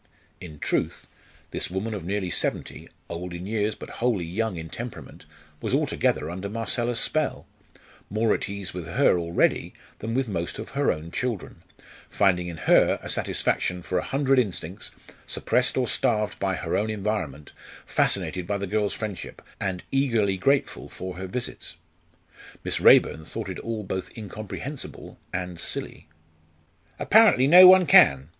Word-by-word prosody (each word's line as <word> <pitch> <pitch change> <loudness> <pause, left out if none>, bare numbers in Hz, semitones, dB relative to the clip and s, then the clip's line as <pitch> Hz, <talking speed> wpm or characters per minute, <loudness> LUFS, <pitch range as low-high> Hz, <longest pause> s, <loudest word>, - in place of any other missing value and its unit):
In 85 -5 -10
truth, - - -1 0.5
this - - -2
woman 95 +5 -3
of 100 - -5
nearly 95 0 -2
seventy - - -2 0.2
old 85 +1 -6
in 85 +1 -7
years, 105 0 -1
but - - -9
wholly 115 -8 +1
young 100 +3 -2
in 80 0 -6
temperament 120 -1 -8 0.4
was - - 0
altogether - - 0
under 95 +4 -5
Marcella's 115 +2 -1
spell 155 -3 0 0.6
more 110 +2 +2
at - - -3
ease 100 -2 -5
with 90 -3 -6
her 90 0 +3
already 85 0 0 0.2
than 115 +2 -4
with 135 -1 +1
most 85 -5 -3
of 110 - -7
her 140 +1 +2
own 80 +2 -6
children, 120 -3 -4 0.5
finding 90 -3 +2
in 85 -2 -6
her - - +4
satisfaction 90 0 0
for 90 - -1
a - - -4
hundred 135 -1 +2
instincts, 95 -5 -3 0.4
suppressed - - +1
or - - +1
starved 105 -1 0
by 95 -1 0
her - - -3
own 110 +2 0
environment, 100 -9 -3 0.3
fascinated 90 -1 0
by 100 - 0
the 100 - -3
girl's 105 +1 0
friendship, 105 -4 -6 0.2
and 95 -2 -3
eagerly 115 -8 +2
grateful 135 +9 0
for 90 -1 -7
her 95 +1 -5
visits. 125 +6 -4 0.9
Miss - - -2
Raeburn 80 - +6
thought 105 +5 -5
it 95 - -5
all 115 -2 -4
both 95 -1 -4
incomprehensible 110 +7 -7
and 90 -1 -4
silly. - - -4 0.9
"Apparently 215 - +5
no 180 +6 +10
one 185 0 +8
can!" 70 - +6
100 Hz, 150 wpm, -25 LUFS, 90-115 Hz, 0.9 s, no